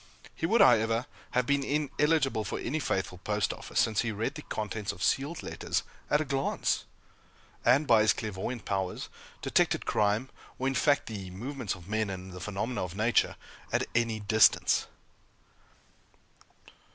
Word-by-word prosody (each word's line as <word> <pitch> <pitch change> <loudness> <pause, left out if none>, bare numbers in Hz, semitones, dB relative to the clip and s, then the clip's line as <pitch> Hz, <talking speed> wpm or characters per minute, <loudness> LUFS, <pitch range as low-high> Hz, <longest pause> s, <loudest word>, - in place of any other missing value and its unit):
He 165 - -2
would, 225 +3 +4
however, 115 - +5 0.3
have 125 - +3
been 140 +1 +2
ineligible 150 -3 +1
for - - -3
any 150 +6 -2
faithful 95 - -2
Post 105 +1 0
Office, - - -3
since 110 -2 +3
he 115 - -1
read 110 +1 -2
the - - -7
contents 105 -1 -3
of - - -7
sealed 145 +5 0
letters - - -2 0.3
at 150 - +4
a 155 - -1
glance; 135 -1 0 0.8
and, 130 +5 +4
by 115 -6 +5
his 110 - +5
clairvoyant 110 +2 -4
powers, 95 -2 -2 0.3
detected - - +2
crime, 105 +5 +1 0.3
or, 130 - -1
in 135 - +1
fact, 145 +2 +3
the 100 -4 -6
movements 120 +3 -4
of 90 -1 -14
men 110 0 0
and 95 -1 -6
the 90 - -8
phenomena 105 +4 -3
of 90 0 -6
nature, 110 +3 +2 0.4
at - - +1
any 115 -2 +1
distance. 110 +2 +4
115 Hz, 155 wpm, -29 LUFS, 105-135 Hz, 0.8 s, however